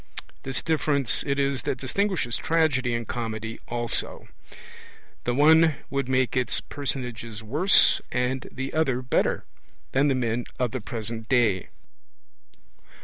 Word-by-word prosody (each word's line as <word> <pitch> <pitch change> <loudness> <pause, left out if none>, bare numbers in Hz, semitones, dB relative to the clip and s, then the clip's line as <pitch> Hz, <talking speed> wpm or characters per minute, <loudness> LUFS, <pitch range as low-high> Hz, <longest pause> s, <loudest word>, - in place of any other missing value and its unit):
This 135 -1 -2
difference 150 -5 +2
it 140 0 0
is 140 -1 0
that - - -2
distinguishes 160 - -1
Tragedy 140 -7 +1
and 115 -1 -4
Comedy 115 -2 -4
also; 120 -1 -1 1.0
the 120 - +1
one 160 +2 +6 0.2
would 140 -2 -1
make 130 -1 +1
its 125 -1 +1
personages 120 -5 -4
worse, 150 - +4
and 125 +1 -1
the 135 +1 -5
other 130 -5 +1
better, 125 - 0 0.5
than 135 +2 +3
the 135 - +2
men 120 -1 -1
of 125 -3 0
the 130 - -4
present 115 0 -5
day. 110 -8 +2
130 Hz, 130 wpm, -25 LUFS, 120-140 Hz, 1.0 s, one